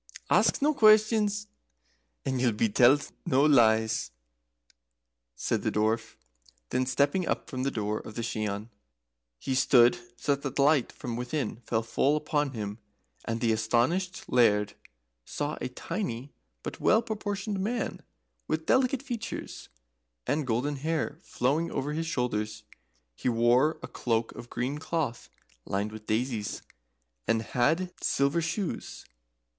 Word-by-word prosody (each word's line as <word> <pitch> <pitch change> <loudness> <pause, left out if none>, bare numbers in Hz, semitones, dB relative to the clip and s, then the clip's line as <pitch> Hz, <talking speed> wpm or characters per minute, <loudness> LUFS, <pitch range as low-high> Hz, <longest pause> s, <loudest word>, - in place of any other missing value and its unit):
"Ask - - +4
no 305 +1 +4
questions, 215 -3 +4 0.8
and 130 -2 0
ye'll 120 -3 +3
be 110 +1 +1
tellt 130 +7 +4
no 140 -4 +3
lees," 110 -6 +4 1.3
said - - -1
the - - 0
Dwarf. 110 +1 0 0.6
Then 130 0 +1
stepping 145 +7 +1
up - - -1
to 130 -2 -3
the 135 - +1
door 105 -3 -2
of 110 - -10
the 115 - -3
Shian, 110 -1 -3 0.7
he 130 - -3
stood 120 -2 +5 0.2
so 145 - +2
that 140 -1 -4
the - - -3
light 140 -2 +4
from 120 -2 -5
within 125 -1 -2
fell 115 -1 -2
full 140 +6 +2
upon 150 -2 -1
him, 105 -1 -5 0.5
and 115 0 -2
the 115 -2 +3
astonished 120 +12 +1
Laird 105 -4 +3 0.5
saw 145 - -3
a - - -2
tiny 140 - -4 0.3
but - - -6
well 220 +2 +4
proportioned 205 -2 -3
man, 225 +5 -2 0.5
with 160 0 -1
delicate 260 0 +2
features, 240 -5 -6 0.6
and 145 -1 0
golden 130 +5 0
hair 155 +1 -2
flowing 155 +2 0
over 145 0 -2
his 165 +1 -2
shoulders. 110 -8 -2 0.5
He - - -2
wore 120 +6 +3
a - - -4
cloak 115 -1 -1
of 120 - -10
green 130 +5 -2
cloth, 155 -7 -3 0.3
lined 100 +7 -2
with 110 0 -10
daisies, 110 -1 -1 0.6
and 115 0 +2
had 165 +11 +1
silver 140 +5 +2
shoes. 170 +3 -4
130 Hz, 140 wpm, -28 LUFS, 115-160 Hz, 1.3 s, stood